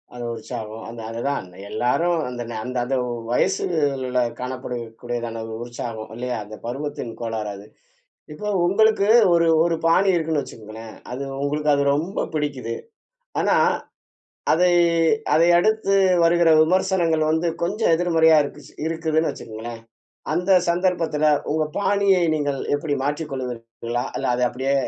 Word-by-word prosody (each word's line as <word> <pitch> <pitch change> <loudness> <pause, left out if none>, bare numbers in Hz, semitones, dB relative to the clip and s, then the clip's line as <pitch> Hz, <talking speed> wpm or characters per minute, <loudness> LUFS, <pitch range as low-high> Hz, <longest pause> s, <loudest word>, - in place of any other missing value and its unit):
அது 120 - -6
உற்சாகம். 110 0 -7
அந்த 115 0 -8
அதுதான், 130 0 -2 0.2
எல்லாரும் 165 +10 +1
அந்த 120 -1 -6
ந - - -5
அந்த 125 0 -4
அந்த 135 +1 -1 0.4
வயசுல 135 -3 0 0.2
காணப்படக்கூடியதான 120 -2 -5 0.2
உற்சாகம் 115 -2 -6
இல்லையா! 125 0 -3
அந்த 110 +1 -10
பருவத்தின் 135 -2 -4
கோளாறு 110 -2 -3
அது. 100 +1 -11 0.7
இப்போ 210 +7 -5 0.2
உங்களுக்கு 205 +2 +3 0.3
ஒரு 170 -1 +4 0.2
ஒரு 170 -1 +1
பாணி 190 +4 +4
இருக்குனு 160 -3 0
வச்சுக்கோங்களேன், 110 -3 -10 0.2
அது 135 +3 -4 0.2
உங்களுக்கு 150 +1 0
அது 140 - +1
ரொம்ப 170 +6 -3 0.2
பிடிக்கிது. 140 -6 -2 0.7
ஆனா - - +3 1.0
அதை 180 +3 +4 0.6
அதை 165 +2 +5
அடுத்து 215 +1 +1 0.3
வருகிற 170 0 +4
விமர்சனங்கள் 170 -2 +2
வந்து 160 +2 +1
கொஞ்சம் 200 +2 +1
எதிர்மறையா 160 -2 +4
இருக்கி - - -8 0.2
இருக்குதுனு 160 -1 0
வச்சுக்கோங்களேன், 115 +1 -8 0.5
அந்த 180 +2 -1 0.2
சந்தர்ப்பத்தில 170 -4 +1 0.3
உங்க 155 0 +1
பாணியை 200 -2 +3
நீங்கள் 145 -3 -1 0.2
எப்படி 145 -1 -2
மாற்றிக் 150 +1 -2
கொள்வீர்களா? 120 -2 -4
இல்ல - - -2
அதை 125 0 +1
அப்படியே 135 +2 -1
145 Hz, 125 wpm, -22 LUFS, 120-170 Hz, 1.0 s, அதை